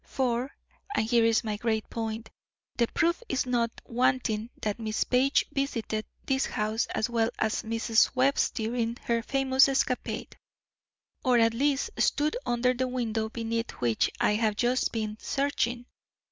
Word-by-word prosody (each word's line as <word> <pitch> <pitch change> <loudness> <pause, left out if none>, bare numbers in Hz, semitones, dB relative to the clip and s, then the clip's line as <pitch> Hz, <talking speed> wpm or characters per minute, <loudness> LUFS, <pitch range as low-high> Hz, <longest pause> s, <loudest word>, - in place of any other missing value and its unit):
For, 255 0 -1 0.4
and - - +2
here 235 0 +3
is 225 +1 +3
my 215 -2 -2
great 220 0 -1
point, 225 0 -4 0.4
the 235 - +2
proof 340 - +1
is 265 - 0
not 240 -2 +1 0.2
wanting 235 -2 0
that 210 +1 -1
Miss 220 -1 -1
Page 260 +3 +2
visited 230 -6 -2 0.2
this 265 -1 +1
house 215 +2 -1
as 220 - -1
well 230 -1 +1
as 220 0 0
Mrs. 225 +2 +2
Webb's 265 +2 +3
during 230 0 -2
her 235 -1 +1
famous 270 +2 +3
escapade; 265 -2 -1 0.9
or 255 -3 +4
at 230 -1 +4
least 275 +3 +1
stood 300 +5 +2
under 240 +1 +2
the 255 +1 -1
window 225 -3 -2
beneath 230 0 -3
which 115 -2 +1
I - - +3
have 215 -1 +1
just 245 +3 +1
been 215 -1 -3
searching. 250 -4 -1
235 Hz, 150 wpm, -28 LUFS, 220-255 Hz, 0.9 s, or